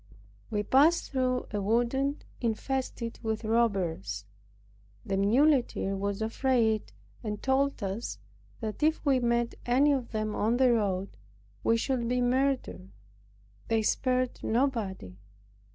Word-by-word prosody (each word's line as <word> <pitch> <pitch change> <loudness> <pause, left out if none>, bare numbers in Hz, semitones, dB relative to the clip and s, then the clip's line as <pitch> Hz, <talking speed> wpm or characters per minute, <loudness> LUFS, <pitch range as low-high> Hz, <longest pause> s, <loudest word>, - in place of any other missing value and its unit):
We 210 -3 -1
passed 290 +10 +3
through 255 -2 0
a 205 -1 -2
wood 235 +4 +1 0.5
infested 235 0 -2
with 220 -1 -2
robbers. 180 - 0 0.8
The 195 - -1
muleteer 235 0 +2
was 200 +2 -2
afraid, 225 -2 +1 0.3
and 210 -2 -3
told 270 -2 +1
us, 195 +4 -3 0.4
that, 215 +3 -4
if 310 +1 +1
we 270 -3 +4
met 235 -1 +1
any 270 +5 +4
of 260 -4 -1
them 215 -1 -2
on 225 +3 +1
the 255 -2 +5
road, 200 -4 -1 0.5
we 230 - +3
should 240 0 -1
be 250 +1 +1
murdered. 245 - 0 0.8
They 225 -1 +1
spared 255 +2 0
nobody. 220 - -1
235 Hz, 120 wpm, -29 LUFS, 210-255 Hz, 0.8 s, the